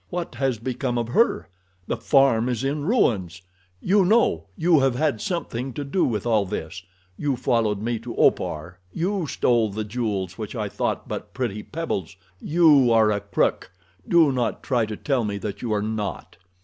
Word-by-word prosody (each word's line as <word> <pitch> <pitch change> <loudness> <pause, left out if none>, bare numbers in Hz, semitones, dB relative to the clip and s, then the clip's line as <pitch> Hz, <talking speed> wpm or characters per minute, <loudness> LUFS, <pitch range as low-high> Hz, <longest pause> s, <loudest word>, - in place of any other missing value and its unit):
"What 175 -4 -4
has 130 -1 -1
become 125 +2 -3
of 120 -1 -2
her? 230 - +2 0.4
The - - -2
farm 135 -4 +3
is 125 0 -2
in 145 +2 -1
ruins. 95 - +1 0.4
You 195 - +3
know. 180 - +2
You 165 -2 +4
have 135 -2 +2
had 125 -5 0
something 135 -8 -3
to 145 - -4
do 145 +7 0
with 110 -3 -2
all 110 -3 +3
this. 90 -1 -5 0.4
You 145 -3 0
followed 110 -4 0
me 115 0 -1
to 115 +1 -7
Opar, 80 +4 0
you 180 - -1
stole 120 -5 +2
the 110 +2 -4
jewels 105 -5 -3
which - - -5
I - - -2
thought - - -2
but - - -6
pretty 115 -5 -2
pebbles. 105 - -4 0.2
You 150 -6 +4
are 110 -2 +4
a 100 - 0
crook! 100 -2 -1 0.4
Do 165 -4 +5
not 125 -3 -2
try 120 -4 +1
to 105 -1 -5
tell 135 -5 0
me 100 -1 -2
that 100 0 -6
you 120 - -3
are 105 -1 0
not." 110 -1 -4
120 Hz, 180 wpm, -24 LUFS, 105-140 Hz, 0.4 s, Do